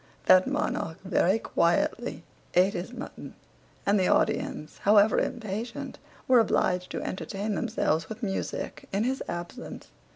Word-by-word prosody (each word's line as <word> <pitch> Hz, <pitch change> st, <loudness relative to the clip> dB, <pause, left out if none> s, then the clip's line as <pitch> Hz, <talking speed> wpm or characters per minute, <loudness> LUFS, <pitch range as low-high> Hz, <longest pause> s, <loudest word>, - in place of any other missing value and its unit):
that 185 Hz, 0 st, +6 dB
monarch 160 Hz, -, -1 dB
very 190 Hz, +1 st, +2 dB
quietly -, -, 0 dB, 0.3 s
eat 185 Hz, +2 st, +5 dB
his 175 Hz, +6 st, -4 dB
mutton, 250 Hz, -, -8 dB, 0.5 s
and 200 Hz, 0 st, +3 dB
the 185 Hz, -, +2 dB
audience, 150 Hz, -, 0 dB
however 210 Hz, +1 st, +5 dB
impatient, 235 Hz, +3 st, -4 dB, 0.3 s
were 255 Hz, -2 st, +6 dB
obliged 180 Hz, -4 st, +1 dB
to -, -, -4 dB
entertain 200 Hz, +3 st, -3 dB
themselves 200 Hz, -7 st, 0 dB
with 220 Hz, +2 st, -7 dB
music 195 Hz, -2 st, -4 dB
in 200 Hz, +2 st, +1 dB
his 260 Hz, +2 st, -1 dB
absence. 175 Hz, +8 st, -7 dB
200 Hz, 130 wpm, -28 LUFS, 185-230 Hz, 0.5 s, that